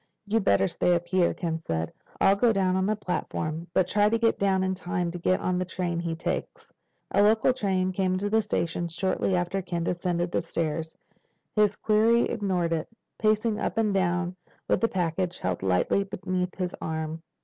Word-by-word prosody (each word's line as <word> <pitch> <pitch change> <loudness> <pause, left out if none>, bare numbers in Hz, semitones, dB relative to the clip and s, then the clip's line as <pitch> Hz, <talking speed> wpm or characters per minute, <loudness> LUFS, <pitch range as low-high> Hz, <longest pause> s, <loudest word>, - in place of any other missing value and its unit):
"You'd 215 +1 +1
better 100 -1 +4
stay 180 - +2
up 170 0 -2
here," 185 -2 +2
Ken 165 -2 -3
said. 80 - -3 0.3
"I'll 195 - +5
go 230 +3 +3
down 190 -3 +1
on 190 +1 +1
the 215 - +1
platform. 170 -4 -3
But 180 0 +2
try 210 0 +3
to 230 - +2
get 230 0 +2
down 190 -1 +2
in 190 0 0
time 175 -2 -2
to 175 - -6
get 185 +2 +2
on 180 0 0
the - - +1
train 175 -2 -2
he 170 -1 -2
takes." 160 - -4 0.4
A 200 - +4
local 220 +4 +4
train 190 -6 0
came 185 0 0
into 190 +2 -1
the 220 +2 +3
station 175 -4 -1
shortly 185 +2 0
after 180 +2 -1
Ken 175 -2 -3
descended 175 0 -1
the - - +1
stairs. 160 -1 -3 0.6
His 210 -1 +3
quarry 225 +2 +3
ignored 180 -4 0
it, 160 -1 -2 0.3
pacing 215 0 +2
up - - -2
and 215 -2 +2
down 180 -1 0 0.3
with - - +2
the 230 - +4
package 180 0 -1
held 90 -1 -2
tightly 95 - +2
beneath 185 -2 -3
his 180 -2 -3
arm. 160 0 -3
185 Hz, 195 wpm, -27 LUFS, 170-200 Hz, 0.6 s, I'll